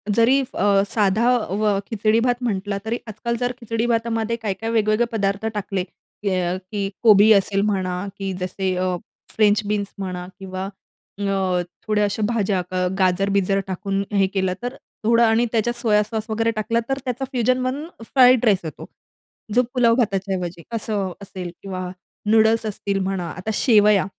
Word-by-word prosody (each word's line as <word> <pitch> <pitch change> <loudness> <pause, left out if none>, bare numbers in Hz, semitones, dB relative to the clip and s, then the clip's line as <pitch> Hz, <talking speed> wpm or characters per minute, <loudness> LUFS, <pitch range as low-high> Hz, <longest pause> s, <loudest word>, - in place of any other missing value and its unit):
जरी, 245 +4 +5
अ, 200 0 +3
साधा 215 +2 +2
अ, 205 -1 0
खिचडी-भात 230 +3 +1
म्हटलं 200 -3 -1
तरी 230 +2 -1
आजकाल 230 +2 -3
जर 245 0 0
खिचडी-भातामध्ये 230 0 -1
काय-काय 215 +1 -3
वेगवेगळे 220 +1 +2
पदार्थ 200 -1 -1
टाकले 200 -2 -2
अ, 185 -1 -3
की 200 -2 -1
अ, - - -5
कोबी 215 0 +7
असेल 195 0 +2
म्हणा 185 -2 -1
की 195 -1 -3
जसे 185 0 -2
अ, 185 0 0 0.4
फ्रेंच 210 -1 +4
बीन्स 205 -1 -2
म्हणा 180 -2 -4
किंवा 190 0 -5 0.5
अ, 190 -2 0 0.3
थोड्या 210 -1 +2
अशा 205 +2 -2
भाज्या 205 -5 0 0.4
गाजर-बिजर 195 +1 +2
टाकून 195 +1 -2
हे 195 -1 +3
केलं 190 -1 +1
तर, 245 +2 -3 0.3
थोडं 230 +1 +5
आणि 225 +1 +4
त्याच्यात 235 +1 0
सोया 220 -3 +3
सॉस 220 0 -5
वगैरे 225 +1 +1
टाकला 230 +2 0
तर 270 - 0
त्याचा 255 +1 -2
फ्युजन 255 +1 +1
बनून 270 +4 -2 0.2
फ्राईड 250 0 +5
राईस 205 -4 +4
होतो 155 - -7 0.7
जो 250 - +6
पुलाव 235 -3 +4
भाताच्या 195 -5 0
ऐवजी 175 -2 -5
असं 210 -4 -2
असेल 185 -3 -7
किंवा 190 -2 -5 0.5
नूडल्स 225 0 +4
असतील 200 -2 -2
म्हणा. 190 -2 -2
आता 185 +4 -5
शेवया. 210 -4 +4
210 Hz, 155 wpm, -22 LUFS, 195-230 Hz, 0.7 s, कोबी